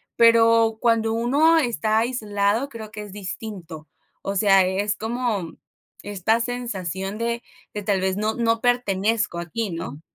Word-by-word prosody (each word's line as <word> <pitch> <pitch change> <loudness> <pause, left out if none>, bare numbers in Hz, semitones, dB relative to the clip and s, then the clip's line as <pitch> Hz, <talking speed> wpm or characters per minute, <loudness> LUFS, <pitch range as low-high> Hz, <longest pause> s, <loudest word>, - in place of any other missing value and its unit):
pero 230 -1 +5
cuando 230 -2 +2
uno 285 +8 +3
está 230 -6 +1
aislado, 220 0 0
creo 220 -4 -8
que 210 - -7
es 205 - -9
distinto. 185 -5 -7 0.4
O 195 0 -3
sea, 195 -2 +5
es 200 +3 0
como 220 -6 -2 0.5
esta 205 +3 0
sensación 205 -5 -3
de 235 0 -2 0.3
de, 210 - -4
tal 195 -2 +1
vez, 190 +1 0
no 215 +1 0
no 230 -1 +1
pertenezco 220 -5 +1
aquí, 195 +6 -3
¿no? 160 -3 -6
220 Hz, 140 wpm, -23 LUFS, 195-230 Hz, 0.5 s, pero